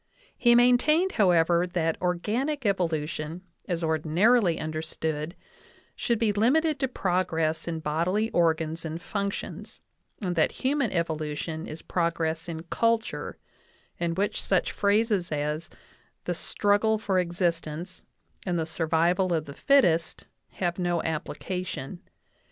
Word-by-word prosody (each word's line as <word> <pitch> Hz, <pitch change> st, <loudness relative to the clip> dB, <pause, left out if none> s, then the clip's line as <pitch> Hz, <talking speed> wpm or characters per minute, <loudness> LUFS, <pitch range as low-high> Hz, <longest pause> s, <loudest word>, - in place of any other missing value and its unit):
He 240 Hz, -1 st, +4 dB
maintained, 250 Hz, +9 st, +4 dB
however, 175 Hz, -2 st, +3 dB
that 165 Hz, -2 st, 0 dB
organic 215 Hz, -, -1 dB
evolu 175 Hz, -, 0 dB
tion, 155 Hz, +3 st, -6 dB, 0.2 s
as 175 Hz, -2 st, -2 dB
ordinarily 165 Hz, +5 st, +3 dB
understood, 155 Hz, +1 st, -3 dB, 0.6 s
should 235 Hz, -, 0 dB
be 215 Hz, -2 st, +1 dB
limited 280 Hz, +8 st, +2 dB
to 265 Hz, -, +1 dB
progress 175 Hz, -8 st, 0 dB
in 165 Hz, -1 st, -3 dB
bodily 175 Hz, +9 st, 0 dB
organs 165 Hz, -1 st, +1 dB
and 160 Hz, 0 st, -4 dB
functions, 200 Hz, +2 st, -5 dB, 0.4 s
and 180 Hz, -4 st, -2 dB
that 160 Hz, -, +2 dB
human 270 Hz, -2 st, +2 dB
evolution 160 Hz, -1 st, -2 dB
is 155 Hz, +1 st, -8 dB
progress 165 Hz, -1 st, -1 dB
in 160 Hz, -1 st, -5 dB
culture, 230 Hz, +6 st, -1 dB, 0.6 s
in 170 Hz, -1 st, -1 dB
which 200 Hz, +3 st, 0 dB
such 190 Hz, -2 st, +1 dB
phrases 205 Hz, -3 st, +1 dB
as 150 Hz, +2 st, -2 dB, 0.6 s
the -, -, 0 dB
"struggle 210 Hz, +2 st, +1 dB
for 195 Hz, -3 st, 0 dB
existence" 175 Hz, -1 st, -2 dB, 0.4 s
and 180 Hz, -2 st, -1 dB
"the 160 Hz, -, 0 dB
survival 170 Hz, +3 st, +1 dB
of 160 Hz, -2 st, 0 dB
the 140 Hz, -, -8 dB
fittest" 175 Hz, -, +2 dB, 0.3 s
have 175 Hz, -1 st, -2 dB
no 175 Hz, -2 st, 0 dB
application. 175 Hz, 0 st, -4 dB
175 Hz, 125 wpm, -27 LUFS, 160-205 Hz, 0.6 s, He